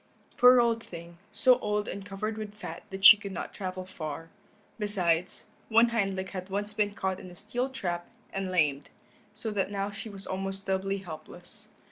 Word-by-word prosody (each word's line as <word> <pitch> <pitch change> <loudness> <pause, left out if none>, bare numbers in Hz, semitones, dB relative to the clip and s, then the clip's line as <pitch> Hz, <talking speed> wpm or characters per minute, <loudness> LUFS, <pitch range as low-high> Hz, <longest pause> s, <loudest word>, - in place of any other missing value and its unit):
Poor 250 0 +8
old 230 -1 +2
thing, 170 0 -10
so 255 -1 +4
old 210 -1 -1
and 200 +1 -5
covered 205 +2 -4
with 215 -1 -6
fat 170 -5 -7
that 195 0 -3
she - - +13
could 200 -1 -7
not 190 - -5
travel 185 -2 -5
far; 165 -3 -6 0.5
besides, 180 -4 0 0.2
one 230 +1 +6
hind 200 -5 0
leg 190 0 -4
had 185 0 -6
once 205 +2 -3
been 205 -1 0
caught 190 -3 -2
in 185 - -10
a 180 - -12
steel 240 +7 -2
trap 175 -9 -3 0.2
and 195 -1 -2
lamed, 150 -6 +1 0.5
so 220 +1 -4
that 195 -2 0
now 200 0 -2
she 215 +2 -7
was 195 -1 +4
almost 195 +1 -4
doubly 195 +1 0
helpless. 175 +4 -8
195 Hz, 185 wpm, -29 LUFS, 185-210 Hz, 0.5 s, she